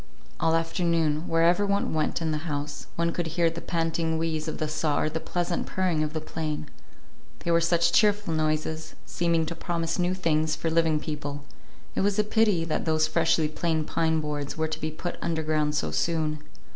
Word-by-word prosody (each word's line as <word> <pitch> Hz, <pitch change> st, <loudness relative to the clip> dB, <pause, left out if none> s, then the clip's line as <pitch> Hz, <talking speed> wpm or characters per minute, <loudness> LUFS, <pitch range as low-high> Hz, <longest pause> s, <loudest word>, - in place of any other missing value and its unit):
All 165 Hz, 0 st, +3 dB
afternoon, 165 Hz, -1 st, +1 dB
wherever 170 Hz, +4 st, +4 dB
one 200 Hz, -3 st, 0 dB
went 155 Hz, +1 st, 0 dB
in 160 Hz, -, 0 dB
the 155 Hz, +2 st, -3 dB
house, 145 Hz, 0 st, -4 dB
one 170 Hz, 0 st, +1 dB
could 170 Hz, 0 st, -2 dB
hear 170 Hz, -1 st, +4 dB
the 165 Hz, +1 st, -6 dB
panting 165 Hz, -1 st, 0 dB
wheeze 160 Hz, -1 st, -1 dB
of 155 Hz, -, -3 dB
the 155 Hz, -, -1 dB
saw 155 Hz, -1 st, 0 dB
or 155 Hz, -, +1 dB
the 160 Hz, -, -2 dB
pleasant 175 Hz, +1 st, -2 dB
purring 180 Hz, -4 st, 0 dB
of 155 Hz, 0 st, -1 dB
the 160 Hz, -, -1 dB
plane. 155 Hz, -1 st, -4 dB, 0.7 s
They 170 Hz, -, -1 dB
were 170 Hz, 0 st, +4 dB
such 170 Hz, 0 st, +3 dB
cheerful 205 Hz, -4 st, +3 dB
noises, 155 Hz, 0 st, -1 dB
seeming 170 Hz, -2 st, +1 dB
to 170 Hz, -, -4 dB
promise 170 Hz, 0 st, -2 dB
new 180 Hz, +1 st, +1 dB
things 155 Hz, -3 st, +1 dB
for 165 Hz, +1 st, -2 dB
living 160 Hz, -2 st, +3 dB
people: 145 Hz, -2 st, -5 dB, 0.5 s
it -, -, 0 dB
was 200 Hz, +1 st, +2 dB
a 210 Hz, -, +4 dB
pity 210 Hz, -5 st, +2 dB
that 160 Hz, -, -2 dB
those 155 Hz, -1 st, +3 dB
freshly 155 Hz, 0 st, +2 dB
planed 160 Hz, 0 st, -1 dB
pine 160 Hz, -1 st, +1 dB
boards 150 Hz, -1 st, -4 dB
were 160 Hz, 0 st, +1 dB
to 155 Hz, 0 st, -4 dB
be 155 Hz, -, -1 dB
put 155 Hz, +3 st, -5 dB
underground 155 Hz, -2 st, 0 dB
so 150 Hz, -, -1 dB
soon. 155 Hz, -2 st, 0 dB
160 Hz, 195 wpm, -27 LUFS, 155-170 Hz, 0.7 s, wherever